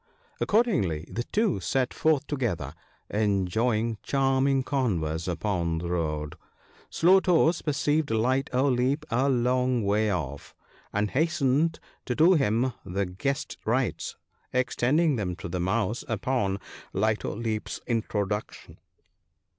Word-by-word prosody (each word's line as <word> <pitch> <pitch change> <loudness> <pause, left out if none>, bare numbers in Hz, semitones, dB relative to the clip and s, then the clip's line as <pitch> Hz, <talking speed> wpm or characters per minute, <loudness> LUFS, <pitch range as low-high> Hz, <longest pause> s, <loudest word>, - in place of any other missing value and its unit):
Accordingly, 170 - +1
the 120 +1 -3
two 210 - +1
set 130 +7 0
forth 155 -3 +2
together 105 - -2 0.4
enjoying 110 +2 +1
charm 135 -1 +1
ing 135 -1 +2
converse 90 - -1
upon 85 -2 -1
the 85 +1 -4
road. 75 -3 -2 0.5
Slow 185 +3 +5
toes 170 -2 +3
perceived 150 0 0
Light 125 +4 +1
o' 130 +3 +2
Leap 130 +3 +1
a 130 +4 +2
long 125 -1 +1
way 105 +2 +2
off, 70 -6 -4 0.4
and 105 0 0
hastened 155 +1 +1 0.3
to 125 - -2
do 165 +5 +6
him 130 - +2
the 100 +3 -2
guest 95 +10 -3
rites, - - -1 0.4
extending 130 +4 +2
them 90 -4 -2
to - - -7
the 90 +2 -3
Mouse 100 +5 0
upon 105 -3 -1 0.3
Light 110 +3 +1
o' - - -3
Leap's 110 -1 -3
introduction. 105 -3 -3
120 Hz, 125 wpm, -27 LUFS, 95-135 Hz, 0.5 s, do